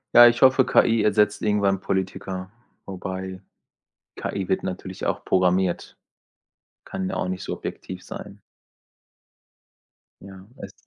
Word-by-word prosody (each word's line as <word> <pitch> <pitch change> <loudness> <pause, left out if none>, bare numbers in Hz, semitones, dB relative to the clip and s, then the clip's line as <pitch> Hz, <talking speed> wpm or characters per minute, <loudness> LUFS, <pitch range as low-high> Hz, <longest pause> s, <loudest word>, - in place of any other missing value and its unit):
Ja, 120 0 +11
ich 120 +2 +2
hoffe, 130 0 +6
KI 115 -2 +3
ersetzt 105 0 +2
irgendwann 100 -2 +2
Politiker, 95 0 -3 0.3
wobei, 95 0 -6 0.7
KI 95 -3 -4
wird 95 - +1
natürlich 95 0 -5
auch - - -2
programmiert. 90 -1 +1 0.9
Kann 190 -1 -4
ja 190 - -4
auch - - -1
nicht 95 0 -4
so - - -4
objektiv - - -7
sein. - - -9 1.8
Ja, 95 -1 -12 0.2
es 100 0 -8
95 Hz, 120 wpm, -24 LUFS, 95-105 Hz, 1.8 s, Ja